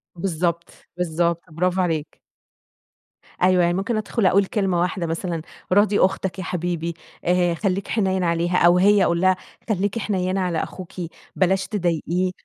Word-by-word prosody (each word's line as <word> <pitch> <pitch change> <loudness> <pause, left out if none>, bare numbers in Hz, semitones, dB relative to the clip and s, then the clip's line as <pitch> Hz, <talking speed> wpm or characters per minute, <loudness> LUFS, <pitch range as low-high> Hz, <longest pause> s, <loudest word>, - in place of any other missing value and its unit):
بالضبط. 170 -1 -1 0.3
بالضبط، 170 -1 0
برافو 180 +3 0
عليك. 160 -4 -2 1.2
أيوه. 185 0 +4
يعني 175 - +2
ممكن 195 +5 -1
أدخُل 215 0 -1
أقول 195 +1 +4
كلمة 190 -4 0
واحدة 180 -1 -1
مثلًا، 165 0 -3 0.3
راضي 205 +1 +4
أختك 190 -1 +1
يا - - -3
حبيبي، 170 -1 -2 0.3
آآ 175 -1 +2
خلّيك 195 +2 -1
حنيّن 190 -4 0
عليها 170 +1 +1
أو 175 +1 +5
هي 200 +1 +5
أقول 170 0 +1
لها، 185 0 +4 0.3
خلّيكِ 205 +2 0
حنيّنة 190 -2 -1
على 175 -3 0
أخوكِ 185 -2 -9 0.4
بلاش 190 +1 +1
تضايقيه. 180 -1 0
180 Hz, 145 wpm, -22 LUFS, 170-190 Hz, 1.2 s, أو